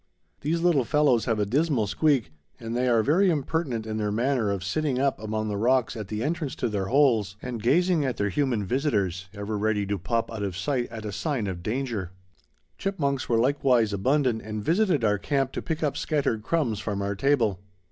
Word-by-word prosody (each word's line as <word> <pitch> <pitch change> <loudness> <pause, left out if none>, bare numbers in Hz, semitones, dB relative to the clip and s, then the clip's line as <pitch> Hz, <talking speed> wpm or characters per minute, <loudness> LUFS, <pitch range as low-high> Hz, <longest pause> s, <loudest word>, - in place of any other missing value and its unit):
These 165 +3 -1
little 170 -6 +3
fellows 135 -2 +2
have 115 -3 +1
a 105 - +1
dismal 135 0 +1
squeak, 130 - +1 0.3
and 115 0 -5
they 125 +1 +1
are 115 -2 +3
very 180 - +3
impertinent 145 -6 -1
in 110 0 -3
their 105 -1 -1
manner 120 0 +1
of 100 -2 -2
sitting 135 +7 -1
up 135 +1 +1
among 110 0 -3
the 105 -1 -2
rocks 125 +3 +2
at 110 -3 -6
the 105 +2 -3
entrance 155 -1 -2
to - - -1
their 100 -2 -2
holes, 115 -7 +3
and 120 -2 -5
gazing 170 - +3
at 130 -4 -2
their 100 0 0
human 120 -2 0
visitors, 100 - -1
ever 100 +1 -4
ready 105 -1 +1
to 100 0 -2
pop 115 +8 -1
out 110 -2 -5
of 95 -3 -3
sight 125 +2 -1
at 110 -2 -7
a 105 - -3
sign 120 +2 -2
of 95 -3 -4
danger. 110 -3 -2 0.7
Chipmunks 140 -9 -1
were 115 - +3
likewise 125 -3 +2
abundant 125 +2 +1
and 105 -1 -5
visited 175 - +2
our 105 -2 +2
camp 135 0 0
to - - -4
pick 160 -1 -3
up 145 - 0
scattered 140 -8 0
crumbs 120 -6 0
from 100 -2 -3
our 100 0 -1
table. 115 -4 +1
120 Hz, 205 wpm, -26 LUFS, 105-140 Hz, 0.7 s, little